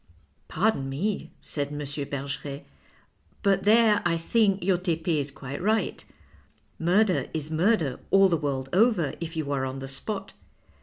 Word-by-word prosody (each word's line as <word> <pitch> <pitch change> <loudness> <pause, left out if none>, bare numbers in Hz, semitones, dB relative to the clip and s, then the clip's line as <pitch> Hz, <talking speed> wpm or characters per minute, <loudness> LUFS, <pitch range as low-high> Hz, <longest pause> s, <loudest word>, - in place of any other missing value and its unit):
" 70 +3 -41
Pardon 175 -7 0
me," 190 +10 -2
said 145 -2 -3
M. 145 0 -7
Bergeret, 140 0 -4 0.4
" - - -36
but 195 -1 +2
there, 215 0 +5
I 170 -1 +1
think, 195 +2 +2
your 180 -1 +2
Tepe 170 -2 -2
is 140 0 -2
quite 140 +1 -7
right. 215 +3 0 0.8
Murder 185 +3 +2
is 155 0 -4
murder 160 - +1
all 195 0 +6
the 175 - +2
world 140 -4 -2
over 190 - +3
if 165 0 -5
30U 155 -3 -2
are 135 -2 0
on 130 0 -4
the 135 0 -6
spot. 195 +9 -2
165 Hz, 160 wpm, -26 LUFS, 140-195 Hz, 0.8 s, all